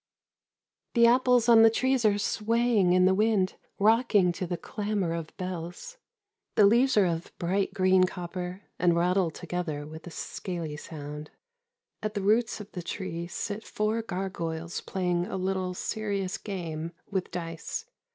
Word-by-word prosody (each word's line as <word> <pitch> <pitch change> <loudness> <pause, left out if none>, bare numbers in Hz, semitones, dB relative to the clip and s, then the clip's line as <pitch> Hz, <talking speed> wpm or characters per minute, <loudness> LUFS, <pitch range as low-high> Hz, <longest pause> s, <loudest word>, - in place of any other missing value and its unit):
The 235 0 +6
apples 245 0 +4
on 230 -1 +8
the 225 - +8
trees 260 +1 +1
are 205 -1 +4
swaying 220 -2 +2
in 185 0 +5
the 190 - +5
wind, 205 -2 +2 0.2
rocking 210 -3 +4
to 175 +1 -4
the 175 - -2
clamour 205 -2 -2
of 165 -2 -6
bells. 180 - -6 0.6
The 210 - +7
leaves 240 +4 +4
are 205 - +6
of 170 -1 -2
bright 190 +3 0
green 185 -1 +5
copper 180 +1 -5 0.2
and 175 -1 +4
rattle 180 +1 +2
together 160 -3 -4
with 160 +3 -10
a - - -5
scaly 165 -2 -5
sound. 150 0 -8 0.7
At 215 +1 -3
the 200 - -1
roots 220 +4 +2
of 210 0 -9
the 180 - -5
tree 170 -1 -4
sit 205 +4 -4
four 215 +2 -1
gargoyles 175 -5 -4
playing 180 -1 -1
a 215 - -3
little 185 -1 -1
serious 200 -2 -2
game 170 -5 -5 0.2
with 190 -2 -1
dice. 165 - -5
185 Hz, 150 wpm, -28 LUFS, 175-215 Hz, 0.7 s, on